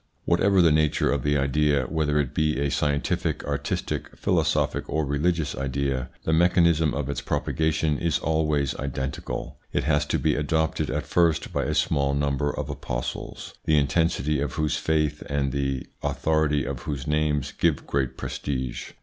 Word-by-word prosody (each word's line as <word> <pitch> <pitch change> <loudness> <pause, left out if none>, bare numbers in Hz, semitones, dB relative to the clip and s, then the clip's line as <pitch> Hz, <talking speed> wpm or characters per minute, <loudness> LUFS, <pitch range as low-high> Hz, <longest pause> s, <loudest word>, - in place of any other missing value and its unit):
Whatever 95 +2 +4
the 80 - +5
nature 75 -1 +2
of 70 - 0
the 75 +2 +1
idea, 70 +1 +2
whether 75 +2 0
it 70 -4 -1
be 75 -2 +1
a 70 0 0
scientific, 75 -1 0
artistic, 70 0 -2
philosophic, - - +1
or 80 -1 0
religious 75 +1 0
idea, 65 -1 -2
the 80 - 0
mechanism 85 -3 +4
of 70 -1 -2
its 70 - -3
propagation 80 -1 0
is 85 -4 +1
always 75 -2 0
identical. 65 0 -4
It - - 0
has 75 -1 +1
to - - +1
be 80 -2 +1
adopted 80 +2 0
at - - -2
first 85 -3 +1
by - - 0
a - - -1
small 70 0 +1
number 70 0 0
of 75 - -4
apostles, 65 -4 -5
the 75 - +4
intensity 75 0 +1
of 70 -3 -2
whose 75 -2 0
faith 75 -2 0
and 70 -1 0
the 70 -1 -1 0.2
authority 80 -3 +1
of 70 -3 -4
whose 65 +1 -4
names 75 -2 0
give 80 -4 0
great 70 -3 -1
prestige. 65 -3 -4
75 Hz, 160 wpm, -25 LUFS, 70-80 Hz, 0.2 s, the